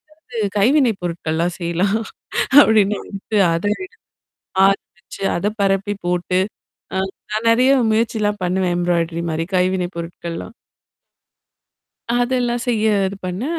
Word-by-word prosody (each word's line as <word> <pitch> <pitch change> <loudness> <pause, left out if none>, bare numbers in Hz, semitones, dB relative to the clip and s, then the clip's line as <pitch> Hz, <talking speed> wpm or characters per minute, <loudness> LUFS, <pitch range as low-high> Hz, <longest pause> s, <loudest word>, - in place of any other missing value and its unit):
இருந்து 250 -6 -11
அது 205 - 0
கைவினை 255 +4 +4
பொருட்கள்லாம் 170 0 -2
செய்யலாம். 180 +4 0 0.6
அப்படின்ட்டு 210 -2 +1 0.2
அத 165 - -2
ரெடி 380 - -6 0.8
ஆரம்பிச்சு, 195 -2 -2 0.2
அத 175 - -1
பரப்பி 195 +1 +1
போட்டு, 180 +1 0 0.6
ஆ - - +1 0.3
நான் 215 +2 -1
நெறைய 255 +4 +4 0.2
முயற்சிலாம் 215 -2 0
பண்ணுவேன். 180 0 0
எம்ப்ராய்டரி 170 -1 0
மாரி. 160 +1 -1
கைவினை 180 0 +1
பொருட்கள்லாம். 170 +4 -6 1.6
அதெல்லாம் 245 -1 0
செய்ய 220 -3 +1 0.2
இது 200 - -7
பண்ணேன், 245 - -3
195 Hz, 110 wpm, -20 LUFS, 175-225 Hz, 1.6 s, கைவினை